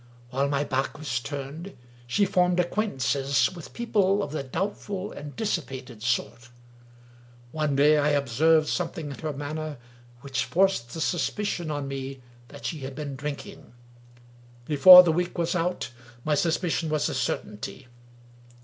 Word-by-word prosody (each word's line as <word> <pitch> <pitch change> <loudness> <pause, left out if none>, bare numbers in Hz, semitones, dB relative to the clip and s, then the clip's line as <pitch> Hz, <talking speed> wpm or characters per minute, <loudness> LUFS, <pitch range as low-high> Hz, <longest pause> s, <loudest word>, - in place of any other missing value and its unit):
While 135 +2 0
my 140 0 +1
back 135 +1 -2
was 140 -6 -2
turned, 145 +7 -7 0.3
she 200 +12 +2
formed 180 -1 +2
acquaintances 140 -8 +1
with 170 -4 -10
people 205 -4 +1
of - - -5
the 155 - -2
doubtful 195 +7 -4
and 145 0 -9
dis 215 -5 0
sipated 130 -6 -10
sort. 120 0 -2 1.0
One 150 -2 -1
day, 150 +2 +5
I 145 +1 +2
observed 150 +3 +3
something 165 -4 -3
in 140 - -9
her 155 -1 -3
mari 145 +1 -5
ner 155 -2 -4 0.4
which 135 -1 -2
forced 155 -5 +1
the 160 - -4
suspicion 175 +1 -1
on 145 -2 -3
me 135 -1 -6 0.3
that 140 +2 -12
she 160 - -3
had 135 0 -7
been 145 -2 -5
drinking. 140 -3 -7 0.9
Before 180 +6 +10
the 170 - +2
week 175 +3 -1
was 170 0 0
out, 180 -5 -1 0.3
my 155 - +2
suspicion 165 +1 0
was 150 -1 +1
a - - -3
certainty. 115 +5 -4
150 Hz, 150 wpm, -26 LUFS, 135-175 Hz, 1.0 s, Before